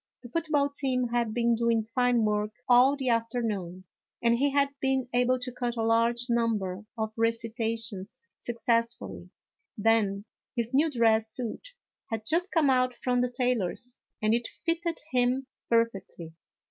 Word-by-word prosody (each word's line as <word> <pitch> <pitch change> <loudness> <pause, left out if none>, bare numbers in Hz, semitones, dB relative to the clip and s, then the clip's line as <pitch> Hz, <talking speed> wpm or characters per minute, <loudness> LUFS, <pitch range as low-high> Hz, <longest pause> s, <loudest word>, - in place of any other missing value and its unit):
The 240 - -9
football 305 -1 +1
team 260 -3 0
had 235 -2 0
been 235 +1 +2
doing 230 -1 +2
fine 240 0 +2
work 210 0 0 0.2
all 255 +3 +6
the 265 -2 -1
afternoon, 225 -6 -1 0.4
and 235 0 +3
he 280 +4 +2
had 280 0 +2
been 265 -1 0
able 250 +1 +3
to 250 0 -5
cut 245 -1 -3
a 225 - 0
large 230 +1 +2
number 215 -5 0
of 220 -1 -2
recitations 225 -3 -2 0.2
success 235 0 0
fully; - - -9 0.5
then, 205 -2 +2 0.3
his 235 +1 -2
new 300 +4 +4
dress 225 -4 +2
suit 250 - -6 0.4
had 220 -2 -4
just 345 - 0
come 305 -5 +3
out 255 -1 +2
from 245 0 0
the 250 - +1
tailor's 245 -1 -1 0.3
and 215 +1 +3
it 235 0 0
fitted 335 0 -2
him 255 +1 +1 0.2
perfectly. 195 -8 -1
235 Hz, 150 wpm, -28 LUFS, 225-255 Hz, 0.5 s, all